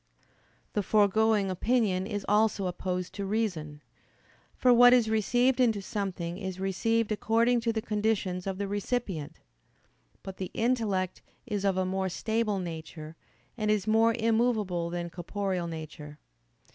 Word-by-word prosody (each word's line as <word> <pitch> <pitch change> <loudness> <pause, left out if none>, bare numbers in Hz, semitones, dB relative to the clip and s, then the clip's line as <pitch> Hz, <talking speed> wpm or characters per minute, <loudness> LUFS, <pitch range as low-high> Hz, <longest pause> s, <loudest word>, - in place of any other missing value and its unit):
The 210 - +1
foregoing 210 0 +3
opinion 195 -2 +1
is 205 -2 -4
also 210 -1 +2
opposed 180 0 -3
to 200 - -4
reason. 175 -9 -2 0.7
For 250 -1 +4
what 245 +1 +8
is 235 -3 +3
received 245 +4 +2
into 230 -5 +3
something 190 -4 -4
is 190 -2 -5
received 220 +4 0
according 230 +3 +2
to 230 0 0
the 220 -1 -3
conditions 205 -4 -1
of 190 -1 -2
the 200 0 -2
recipient. 195 - -3 0.8
But 190 -1 -8
the 185 - -4
intellect 220 -6 0 0.2
is 205 -4 -3
of 195 -2 +1
a 185 - +1
more 190 0 -1
stable 220 +2 -1
nature, 160 -3 -7 0.4
and 215 -3 -2
is 210 -2 +1
more 225 +1 +3
immovable 220 -7 +1
than 170 0 -4
corporeal 185 0 -3
nature. 155 -2 -8
200 Hz, 140 wpm, -29 LUFS, 180-225 Hz, 0.8 s, what